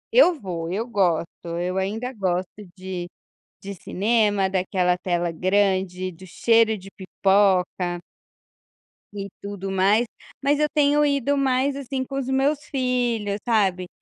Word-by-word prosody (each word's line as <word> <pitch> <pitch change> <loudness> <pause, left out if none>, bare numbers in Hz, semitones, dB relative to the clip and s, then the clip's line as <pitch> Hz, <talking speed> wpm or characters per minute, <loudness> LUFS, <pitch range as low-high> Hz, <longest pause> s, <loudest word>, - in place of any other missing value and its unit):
Eu 360 -10 +6
vou, 170 -5 -4
eu 210 +5 -1
gosto, 180 -7 +1 0.3
eu 180 +1 -2
ainda 220 +7 -2
gosto 185 -4 -1 0.3
de 185 -1 -5 0.6
de 200 0 -6
cinema, 205 0 +1
daquela 185 -1 +1
tela 175 -2 -1
grande, 185 0 +1
do 185 +3 -13
cheiro 225 +4 +3
de 195 0 -12
pipoca 190 -2 +1 1.2
e 200 -1 -5
tudo 200 -1 -5
mais. 195 +5 +3 0.4
Mas 285 +1 +2
eu 300 - +3
tenho 295 0 +4
ido 280 0 +1
mais, 270 0 +1
assim, 270 -1 -3
com 270 +1 -6
os 270 -2 -2
meus 275 +2 +2
filhos, 245 -6 -1
sabe. 190 -6 +2
200 Hz, 135 wpm, -23 LUFS, 185-250 Hz, 1.2 s, Eu